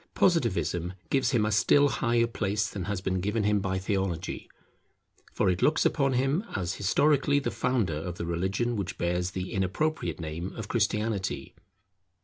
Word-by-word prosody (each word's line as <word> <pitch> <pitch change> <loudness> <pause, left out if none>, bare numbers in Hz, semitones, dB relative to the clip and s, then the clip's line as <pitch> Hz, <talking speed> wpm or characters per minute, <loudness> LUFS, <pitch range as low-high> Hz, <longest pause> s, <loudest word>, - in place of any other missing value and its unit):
Positivism 90 - +1 0.2
gives 135 -3 +2
him 120 -6 +2
a 105 - 0
still 140 +7 +5
higher 120 -3 +1
place 105 -2 -1
than 95 -4 -5
has 100 -1 -2
been 95 -1 -1
given 105 +3 0
him 105 0 +2
by 95 -1 -1
Theology; 95 -2 -2 0.8
for - - 0
it 90 0 +1
looks 155 - +3
upon 135 -3 +2
him 135 +8 +1
as 95 -1 -1
historically 140 +8 +2
the 145 - -1
founder 115 -12 0
of 85 +3 -5
the - - -3
religion 95 +8 -1
which 100 +1 -4
bears 90 +1 0
the 90 0 -5
inappropriate 100 - -1
name 80 +3 -5
of 110 -2 -6
Christianity. 105 -3 -1
100 Hz, 160 wpm, -28 LUFS, 90-120 Hz, 0.8 s, still